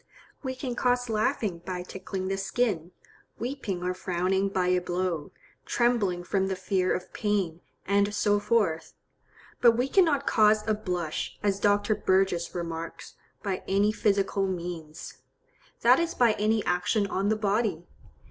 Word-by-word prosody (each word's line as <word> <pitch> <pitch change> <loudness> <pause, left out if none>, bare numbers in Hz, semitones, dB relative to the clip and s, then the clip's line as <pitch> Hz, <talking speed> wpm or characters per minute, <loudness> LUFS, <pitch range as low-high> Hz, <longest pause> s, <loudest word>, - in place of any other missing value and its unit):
We 260 -2 -4
can 255 -1 -4
cause 245 0 +1
laughing 215 -4 0
by 180 +1 -5
tickling 190 +1 -5
the 195 - 0
skin, 195 -4 -1 0.5
weeping 235 -8 -4
or 180 0 0
frowning 185 +2 0
by 185 -2 0
a 180 0 +2
blow, 175 -3 -2 0.3
trembling 215 -8 +1
from 190 +1 0
the 190 - -1
fear 185 0 0
of 180 - -3
pain, 195 -6 -1 0.2
and 200 +1 +2
so 205 0 +2
forth; 205 -6 0 0.7
but 235 -2 +7
we 250 +2 +1
cannot 290 -4 +3
cause 215 -1 +3
a 215 - +3
blush, 180 -6 -3
as 200 -1 +1
Dr. 205 +1 +2
Burgess 190 -4 +1
remarks, 165 -1 -5 0.3
by 195 -3 -2
any 200 +2 +3
physical 200 -2 +1
means,—that 175 -3 -2
is 335 0 -1
by 235 -3 +4
any 215 +1 +1
action 180 +4 +1
on 195 +1 -1
the 220 - +3
body. 210 -4 0
195 Hz, 145 wpm, -27 LUFS, 180-215 Hz, 0.7 s, but